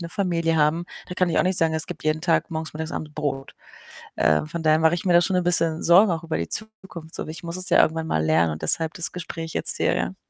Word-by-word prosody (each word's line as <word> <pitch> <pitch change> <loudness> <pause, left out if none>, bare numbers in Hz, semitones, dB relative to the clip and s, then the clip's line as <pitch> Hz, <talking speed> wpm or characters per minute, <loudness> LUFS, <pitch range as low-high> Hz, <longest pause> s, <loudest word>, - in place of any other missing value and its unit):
'ne 170 - -6
Familie 170 -4 0
haben. 155 +3 +2 0.2
Da 180 - -6
kann 185 -1 +1
ich - - +1
auch - - +4
nicht 185 0 +1
sagen, 160 -1 +2
es 160 0 -2
gibt - - -9
jeden 155 0 0
Tag 170 -1 +1
morgens, 160 -1 -4
mittags, 160 +1 -5
abends 150 -1 -6
Brot. 140 -3 -4 0.6
Äh, 75 0 +2
von 165 +2 -6
daher 155 0 +4
mache 160 +1 +4
ich 175 - -5
mir 180 - +2
da 175 - +7
schon 185 +1 0
'n 180 - 0
bisschen 165 -2 +1
Sorgen 185 +5 +6
auch 165 0 -4
über 165 - -2
die 85 - -3
Zukunft 195 -7 -7
so. - - -5
Ich 155 +1 -8
muss 170 +1 -4
es 185 0 +2
ja - - +5
irgendwann 160 0 0
mal 80 0 0
lernen 80 +1 +2
und 75 - -8
deshalb 160 -1 0
das 170 - 0
Gespräch 165 -2 -6
jetzt - - -1
hier, - - +1
ja. - - -2
165 Hz, 275 wpm, -23 LUFS, 155-175 Hz, 0.6 s, da